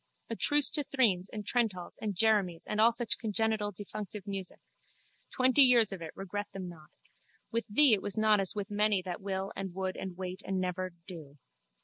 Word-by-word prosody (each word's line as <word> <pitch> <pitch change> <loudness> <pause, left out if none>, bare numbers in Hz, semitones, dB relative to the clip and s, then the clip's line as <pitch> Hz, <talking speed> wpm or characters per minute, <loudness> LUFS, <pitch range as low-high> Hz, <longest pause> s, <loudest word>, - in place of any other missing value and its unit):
A - - -1
truce 290 +4 +3
to 295 - +1
threnes 210 -10 +1
and 210 -2 -7
trentals 205 -7 -1
and 210 -3 -3
jeremies 195 -5 +2
and 210 - -1
all 230 +2 +6
such 235 -1 0
congenital 220 -1 0
defunctive 205 0 -8
music! 195 -2 -3 0.7
Twenty 260 +2 +3
years 240 -5 +6
of 190 -3 -7
it, 165 - -6
regret 205 +2 -5
them 190 -2 -6
not. 160 -3 -12 0.6
With 230 +1 -1
thee 255 +4 +6
it 200 - +3
was 205 +1 -2
not 215 -1 +4
as 195 0 0
with 205 0 -5
many 205 -2 +1
that 180 0 -6
will 195 0 -4
and 190 -2 -5
would 190 -1 -3
and 185 -2 -7
wait 185 +1 -6
and 190 -1 -2
never—do. 175 -5 -6
200 Hz, 190 wpm, -31 LUFS, 185-220 Hz, 0.7 s, all